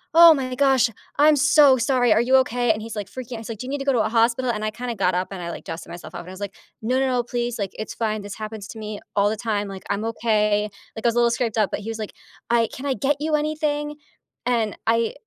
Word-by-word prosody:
"Oh 335 Hz, 0 st, +10 dB
my 255 Hz, -3 st, -3 dB
gosh. 270 Hz, -3 st, +4 dB, 0.3 s
I'm 300 Hz, +1 st, +6 dB
so 290 Hz, -1 st, +6 dB
sorry. 250 Hz, -2 st, +3 dB
Are 220 Hz, -, +3 dB
you 255 Hz, +2 st, +3 dB
okay?" 245 Hz, -2 st, +2 dB
And 215 Hz, 0 st, -2 dB
he's 225 Hz, 0 st, -7 dB
like, 205 Hz, -2 st, -4 dB
freaking 250 Hz, -2 st, -7 dB
he's 225 Hz, +1 st, -8 dB
like, 220 Hz, -2 st, -6 dB
"Do 255 Hz, -, -6 dB
you -, -, -5 dB
need 285 Hz, -, -1 dB
to 275 Hz, -, -4 dB
go 275 Hz, -, +3 dB
to 240 Hz, -, +2 dB
a -, -, +1 dB
hospital?" 235 Hz, +2 st, +2 dB
And 215 Hz, -1 st, -3 dB
I 215 Hz, -, -1 dB
kinda 240 Hz, +1 st, -5 dB
got 185 Hz, -3 st, +1 dB
up 180 Hz, +1 st, 0 dB
and 195 Hz, -, -6 dB
I, 170 Hz, -, -4 dB
like, -, -, -9 dB
dusted 165 Hz, 0 st, -7 dB
myself 175 Hz, -, -9 dB
off, -, -, -5 dB
and 175 Hz, -, -12 dB
I -, -, -8 dB
was 190 Hz, -, -10 dB
like, 200 Hz, 0 st, -5 dB, 0.3 s
"No, 250 Hz, +4 st, +1 dB
no, 270 Hz, -, +2 dB
no, 250 Hz, -1 st, +2 dB
please, 240 Hz, -1 st, -3 dB
like, 195 Hz, -2 st, -2 dB
it's 215 Hz, -, -5 dB
fine. 215 Hz, -1 st, -2 dB
This 205 Hz, -, -7 dB
happens 215 Hz, -1 st, -7 dB
to 225 Hz, -, -8 dB
me 210 Hz, -1 st, -5 dB, 0.2 s
all 205 Hz, 0 st, +3 dB
the 215 Hz, -, -2 dB
time. 210 Hz, -2 st, -1 dB
Like, 195 Hz, -1 st, -8 dB
I'm 200 Hz, +1 st, -1 dB
okay." 210 Hz, -2 st, +1 dB, 0.3 s
Like, 220 Hz, -, -7 dB
I -, -, +6 dB
was -, -, -1 dB
a -, -, +3 dB
little 235 Hz, 0 st, +4 dB
scraped 230 Hz, -2 st, -1 dB
up, 210 Hz, -, +3 dB
but -, -, -3 dB
he 215 Hz, -, -6 dB
was 225 Hz, 0 st, -5 dB
like, 215 Hz, -, -5 dB, 0.4 s
"I 235 Hz, -1 st, +3 dB
can 265 Hz, -, -7 dB
I 270 Hz, -, +1 dB
get 275 Hz, +6 st, +1 dB
you 305 Hz, +1 st, +1 dB
anything?" 300 Hz, -1 st, -1 dB, 0.5 s
And 230 Hz, -4 st, +1 dB
I 230 Hz, 0 st, +2 dB
230 Hz, 290 wpm, -23 LUFS, 210-260 Hz, 0.5 s, Oh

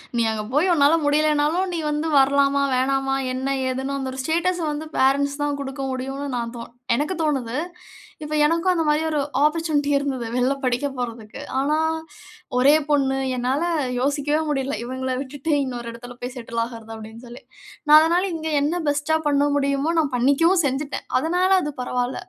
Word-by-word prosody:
நீ 235 Hz, -, +2 dB
அங்க 215 Hz, -1 st, -3 dB
போய் 335 Hz, +6 st, +3 dB
உன்னால 290 Hz, 0 st, +4 dB
முடியலைன்னாலும், 305 Hz, +4 st, +2 dB
நீ 335 Hz, -, -2 dB
வந்து 300 Hz, +2 st, -1 dB
வரலாமா, 280 Hz, +1 st, +3 dB
வேணாமா, 270 Hz, +1 st, +1 dB, 0.2 s
என்ன 265 Hz, +2 st, -1 dB
ஏதுன்னு. 265 Hz, +2 st, -2 dB
அந்த 260 Hz, -1 st, -3 dB
ஒரு 265 Hz, -, -7 dB
ஸ்டேட்டஸ்‌ 345 Hz, +3 st, 0 dB
வந்து 305 Hz, +1 st, -5 dB
பேரண்ட்ஸ் 280 Hz, +2 st, +2 dB
தான் 290 Hz, -1 st, -1 dB
குடுக்க 270 Hz, 0 st, -5 dB
முடியும்ன்னு 270 Hz, +2 st, -4 dB
நா -, -, -1 dB, 0.2 s
தோனு 230 Hz, -, -9 dB, 0.2 s
எனக்கு 300 Hz, +8 st, -1 dB
தோனுது. 260 Hz, -5 st, -1 dB, 0.7 s
இப்ப 305 Hz, 0 st, -3 dB
எனக்கும் 335 Hz, +4 st, +2 dB
அந்த 340 Hz, -3 st, +1 dB
மாதிரி 300 Hz, +1 st, +2 dB
ஒரு 305 Hz, -2 st, 0 dB, 0.3 s
ஆப்பர்சூனிட்டி 305 Hz, -2 st, +1 dB
இருந்தது, 270 Hz, -4 st, -2 dB
வெளியில 250 Hz, +2 st, +2 dB
படிக்கப் 260 Hz, +2 st, -1 dB
போறதுக்கு. 230 Hz, -3 st, -6 dB, 0.2 s
ஆனா, 295 Hz, +3 st, +1 dB, 0.8 s
ஒரே 275 Hz, +4 st, +6 dB, 0.2 s
பொண்ணு! 270 Hz, -2 st, +2 dB, 0.2 s
என்னால 255 Hz, +5 st, -1 dB, 0.4 s
யோசிக்கவே 290 Hz, +2 st, 0 dB
முடியல. 275 Hz, -1 st, -1 dB
“இவங்கள 260 Hz, +1 st, -4 dB
விட்டுவிட்டு, 285 Hz, +3 st, -4 dB
இன்னொரு 245 Hz, -3 st, -5 dB
இடத்தில 245 Hz, +1 st, -10 dB
போய் 245 Hz, +1 st, -5 dB
செட்டில் 235 Hz, -1 st, -5 dB
ஆகிறது” 225 Hz, -2 st, -10 dB
அப்படீன்னு 220 Hz, +2 st, -10 dB
சொல்லி. 240 Hz, +1 st, -11 dB, 0.5 s
நா -, -, +7 dB
அதனால 340 Hz, +3 st, +2 dB
இங்க 320 Hz, 0 st, -4 dB
என்ன 320 Hz, +5 st, 0 dB
பெஸ்ட்‌டா 290 Hz, +2 st, +1 dB
பண்ண 285 Hz, 0 st, +3 dB
முடியுமோ, 280 Hz, +2 st, 0 dB
நா -, -, +3 dB
பண்ணிக்கவும் 305 Hz, +9 st, +3 dB
செஞ்சுட்டேன். 280 Hz, +2 st, -3 dB
அதனால 355 Hz, +6 st, +1 dB
அது 295 Hz, -, -3 dB
பரவால. 250 Hz, 0 st, -2 dB
280 Hz, 165 wpm, -22 LUFS, 255-300 Hz, 0.8 s, நா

